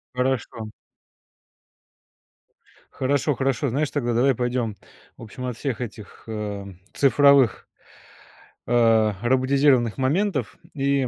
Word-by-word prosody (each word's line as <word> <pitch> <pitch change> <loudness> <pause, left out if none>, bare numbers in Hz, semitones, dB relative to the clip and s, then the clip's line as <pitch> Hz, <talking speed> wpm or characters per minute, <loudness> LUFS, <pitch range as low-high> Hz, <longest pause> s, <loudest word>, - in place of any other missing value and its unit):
Хорошо. 125 -4 -2 2.2
Хорошо 140 +2 0
хорошо. 135 +1 0
Знаешь, 140 +4 -1
тогда 120 -5 -1
давай 130 +3 +3
пойдем, 120 -3 -2 0.4
в - - -11
общем, 125 +4 -8
от 125 -3 -4
всех 130 -4 -3
этих, 110 -3 -9
э, 105 -2 -5 0.3
цифровых 140 -3 +4 1.0
а, 115 -3 +3
роботизированных 130 -1 +2
моментов. 140 - -1 0.2
И, 140 -2 0
125 Hz, 100 wpm, -23 LUFS, 115-140 Hz, 2.2 s, цифровых